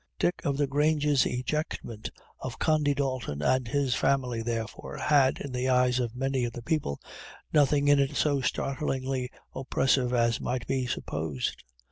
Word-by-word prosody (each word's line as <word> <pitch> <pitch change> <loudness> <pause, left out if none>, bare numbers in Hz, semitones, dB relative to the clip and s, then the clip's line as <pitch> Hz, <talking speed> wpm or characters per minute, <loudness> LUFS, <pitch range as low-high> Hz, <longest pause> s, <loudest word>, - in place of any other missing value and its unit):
Dick 175 - 0
o' 145 - +1
the 140 +1 +1
Grange's 145 0 +2
ejectment 125 -4 -3 0.3
of 130 -3 -6
Condy 150 -2 +2
Dalton 130 - -2
and 130 - +2
his 135 +1 +1
family, 125 -3 +1
therefore, 115 -1 -4
had, 140 -3 +3
in 140 - -6
the 125 +1 -1
eyes 125 0 +3
of 120 -1 -2
many 135 0 0
of 120 -1 -2
the 120 - -7
people, 150 - -1 0.5
nothing 145 -1 +4
in 145 0 +6
it 140 -1 +1
so 145 -3 +2
startlingly 130 -1 -1 0.2
oppressive 130 -1 +1
as 115 -2 +2
might 125 -1 -2
be 130 -2 -1
supposed. 75 - -3
130 Hz, 155 wpm, -28 LUFS, 125-140 Hz, 0.5 s, in